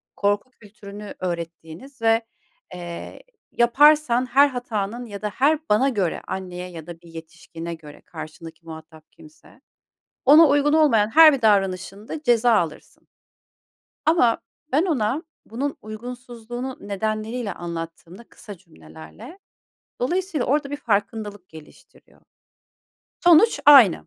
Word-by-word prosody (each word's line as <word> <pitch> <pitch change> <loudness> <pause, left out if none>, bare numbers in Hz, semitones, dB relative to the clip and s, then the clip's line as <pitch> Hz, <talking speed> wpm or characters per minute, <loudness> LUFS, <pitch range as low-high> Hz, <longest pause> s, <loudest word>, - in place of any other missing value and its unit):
korku 205 +5 -1
kültürünü 210 -2 -12
öğrettiğiniz 170 - -7
ve, 225 0 +3 0.5
eee, 175 - -8 0.3
yaparsan 255 +1 +4
her 275 +3 +4
hatanın 240 -3 -4
ya 205 -2 -9
da 210 - -2
her 285 +8 +1
bana 255 +7 +3
göre 195 -9 -2
anneye 180 -1 -6
ya 165 -2 -10
da 170 -1 -10
bir 170 - -17
yetişkine 165 +1 -9
göre 150 -3 -13
karşındaki 165 0 -11
muhatap 160 -1 -13
kimse, 310 0 -19 0.6
ona 305 +4 +7
uygun 290 +1 +2
olmayan 270 -10 +3
her 315 +2 +8
bir 270 -4 -3
davranışında 200 - 0
ceza 240 -3 +3
alırsın. 165 -7 -4 1.0
Ama 280 -8 +3 0.3
ben 300 +6 +3
ona 265 - -1 0.2
bunun 275 +5 -4
uygunsuzluğunu 240 +2 -8
nedenleriyle 215 +2 -3
anlattığımda 170 +4 -8
kısa 205 -5 -12
cümlelerle 80 - -14 0.6
dolayısıyla 345 +1 -1
orada 285 +1 0
bir 290 - -3
farkındalık 205 -5 -3
geliştiriyor. 160 -1 -17 1.0
Sonuç 350 +6 +5
aynı. 265 - +7
215 Hz, 115 wpm, -22 LUFS, 175-265 Hz, 1.0 s, her